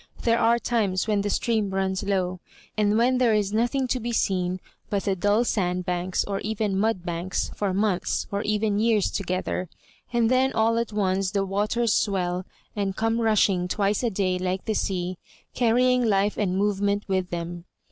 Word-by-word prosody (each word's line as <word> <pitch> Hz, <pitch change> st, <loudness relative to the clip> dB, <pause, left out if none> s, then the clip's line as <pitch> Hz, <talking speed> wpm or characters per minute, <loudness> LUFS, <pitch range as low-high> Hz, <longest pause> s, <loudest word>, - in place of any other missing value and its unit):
There 230 Hz, 0 st, +3 dB
are 235 Hz, +1 st, +4 dB
times 215 Hz, -6 st, 0 dB
when 210 Hz, -2 st, +1 dB
the 205 Hz, -, -2 dB
stream 215 Hz, -1 st, 0 dB
runs 190 Hz, 0 st, -1 dB
low, 185 Hz, -3 st, -1 dB, 0.4 s
and 210 Hz, 0 st, +2 dB
when 250 Hz, +2 st, +3 dB
there 235 Hz, -4 st, +4 dB
is 205 Hz, -1 st, 0 dB
nothing 245 Hz, +4 st, +1 dB
to 255 Hz, -, 0 dB
be 240 Hz, +1 st, -3 dB
seen 185 Hz, -4 st, 0 dB, 0.3 s
but 200 Hz, -1 st, -1 dB
the 195 Hz, -2 st, 0 dB
dull 205 Hz, +5 st, +2 dB
sandbanks, 180 Hz, -3 st, -1 dB
or 200 Hz, -1 st, -3 dB
even 215 Hz, -1 st, -2 dB
mudbanks, 185 Hz, -4 st, -1 dB
for 205 Hz, -2 st, -1 dB
months, 195 Hz, -1 st, 0 dB
or 200 Hz, 0 st, -1 dB
even 210 Hz, -1 st, 0 dB
years 220 Hz, -2 st, +2 dB
toge 185 Hz, -1 st, -2 dB
ther; 180 Hz, -2 st, -3 dB, 0.4 s
and 235 Hz, -1 st, +2 dB
then 260 Hz, +1 st, +3 dB
all 225 Hz, +1 st, +2 dB
at 235 Hz, -2 st, -2 dB
once 195 Hz, -2 st, 0 dB
the 200 Hz, 0 st, 0 dB
waters 210 Hz, +4 st, 0 dB
swell, 185 Hz, -2 st, 0 dB, 0.3 s
and 200 Hz, -2 st, -1 dB
come 225 Hz, +1 st, 0 dB
rushing 200 Hz, -5 st, +2 dB
twice 200 Hz, +2 st, 0 dB
a 240 Hz, -, +1 dB
day 185 Hz, -3 st, 0 dB
like 185 Hz, +1 st, -2 dB
the 220 Hz, -, 0 dB
sea, 185 Hz, -3 st, -2 dB, 0.3 s
carrying 250 Hz, +1 st, +3 dB
life 205 Hz, -2 st, +2 dB
and 190 Hz, -3 st, 0 dB
movement 205 Hz, 0 st, 0 dB
with 190 Hz, -2 st, -1 dB
them. 170 Hz, 0 st, -5 dB
205 Hz, 175 wpm, -25 LUFS, 185-225 Hz, 0.4 s, are